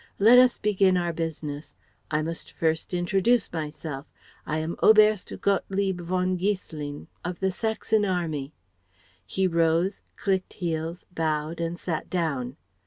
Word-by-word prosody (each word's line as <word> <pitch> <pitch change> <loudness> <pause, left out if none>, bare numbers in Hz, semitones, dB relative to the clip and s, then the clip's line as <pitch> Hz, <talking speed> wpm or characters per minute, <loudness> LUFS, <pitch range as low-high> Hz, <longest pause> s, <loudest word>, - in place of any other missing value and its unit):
Let 230 +5 +8
us 255 -1 +5
begin 195 -3 +3
our 175 -1 0
business. 155 -2 -5 0.3
I 155 0 0
must 165 +1 -5
first 160 -1 0
introduce 190 +6 +2
myself. 155 -2 -5 0.4
I 155 - 0
am 160 +2 -2
Oberst 215 -2 +5
Gottlieb 195 -2 0
von 185 +1 0
Giesselin 160 -7 -3 0.2
of 175 0 -4
the 190 0 +1
Saxon 220 +1 0
Army. 165 -7 -1 0.8
(He 190 - 0
rose, 170 +2 +2
clicked 190 -2 -1
heels, 165 -1 -3
bowed, 155 0 -1
and 170 +1 -2
sat 165 -2 -4
down.) 140 -7 -2
175 Hz, 130 wpm, -26 LUFS, 160-190 Hz, 0.8 s, Let